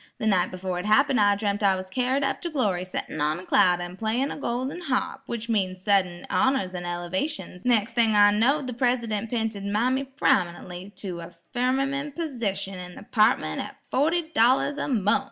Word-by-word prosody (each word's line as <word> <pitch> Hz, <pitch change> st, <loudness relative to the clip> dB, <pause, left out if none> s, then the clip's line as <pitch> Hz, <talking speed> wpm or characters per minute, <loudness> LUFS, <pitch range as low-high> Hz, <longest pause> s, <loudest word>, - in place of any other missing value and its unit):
The -, -, -4 dB
night 195 Hz, -4 st, +3 dB
befo' 185 Hz, 0 st, -4 dB
it 180 Hz, +3 st, -4 dB
happened 270 Hz, +3 st, +4 dB
I 205 Hz, 0 st, +4 dB
dreamt 205 Hz, 0 st, -1 dB
I 195 Hz, -2 st, +4 dB
was 185 Hz, 0 st, -7 dB
carried 260 Hz, +4 st, 0 dB
up 270 Hz, -, -1 dB
to 345 Hz, -, -3 dB
glory'settin' 185 Hz, -, -2 dB
on 150 Hz, +2 st, +1 dB
a 185 Hz, -, -10 dB
cloud 180 Hz, -2 st, +4 dB
an' 175 Hz, +1 st, -7 dB
playin' 230 Hz, +6 st, 0 dB
on -, -, -6 dB
a -, -, -11 dB
golden 260 Hz, +8 st, -2 dB
harp, 270 Hz, -3 st, -2 dB
which 230 Hz, -1 st, -4 dB
means 185 Hz, -5 st, -1 dB
suddint 185 Hz, -4 st, +1 dB
honors 260 Hz, -9 st, +1 dB
an' 175 Hz, -1 st, -5 dB
el'vations; 180 Hz, -, -4 dB
nex' 230 Hz, -3 st, +2 dB
thing 225 Hz, -2 st, +3 dB
I 205 Hz, 0 st, +7 dB
knowed 265 Hz, +8 st, +2 dB
the 250 Hz, -, -4 dB
Presidunt 230 Hz, -3 st, 0 dB
'pinted 225 Hz, -4 st, -2 dB
mammy 245 Hz, +7 st, 0 dB
prominen'ly 180 Hz, -7 st, -1 dB
to 180 Hz, -4 st, -6 dB
a 170 Hz, +1 st, -9 dB, 0.2 s
firmamen' 275 Hz, +3 st, 0 dB
persition 200 Hz, -, -3 dB
in 180 Hz, 0 st, -8 dB
the -, -, -10 dB
'partment 215 Hz, +3 st, +2 dB
at -, -, -8 dB
forty 320 Hz, +4 st, +1 dB
dollars 255 Hz, +5 st, +3 dB
a -, -, -2 dB
munf. 225 Hz, -1 st, +2 dB
220 Hz, 190 wpm, -25 LUFS, 185-260 Hz, 0.2 s, I